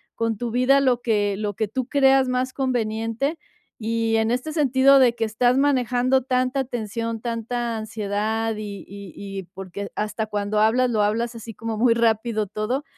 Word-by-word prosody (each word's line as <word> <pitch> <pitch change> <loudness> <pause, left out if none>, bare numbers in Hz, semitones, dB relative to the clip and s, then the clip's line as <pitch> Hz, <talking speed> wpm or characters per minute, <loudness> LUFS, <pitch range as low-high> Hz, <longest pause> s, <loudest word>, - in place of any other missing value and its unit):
con 230 -1 -1
tu 240 +2 -3
vida 255 +3 +4
lo 250 -3 +2
que 205 -4 +1
lo 210 0 -2
que 220 - -1
tú 255 +4 -3
creas 270 -2 +4
más 255 +1 -1
conveniente. 235 +2 -1 0.4
Y 225 0 0
en 220 0 +1
este 250 +6 -2
sentido, 275 -2 +5
de 255 -3 +5
que 235 - -3
estás 235 +3 +2
manejando 255 -2 +2
tanta 255 +1 0
tensión, 230 -2 -4
tanta 235 0 -3
ansiedad 220 +1 -2
y 205 -2 -7
y 200 -4 -10
y 195 -1 -6
porque 195 +1 -7
hasta 210 +1 -2
cuando 210 0 -1
hablas, 240 +4 +3
lo 215 -3 +1
hablas 230 +3 -1
así 225 0 -8
como 225 0 -5
muy 235 +1 +4
rápido 225 -2 +1
todo, 215 +8 -2
230 Hz, 170 wpm, -23 LUFS, 215-255 Hz, 0.4 s, sentido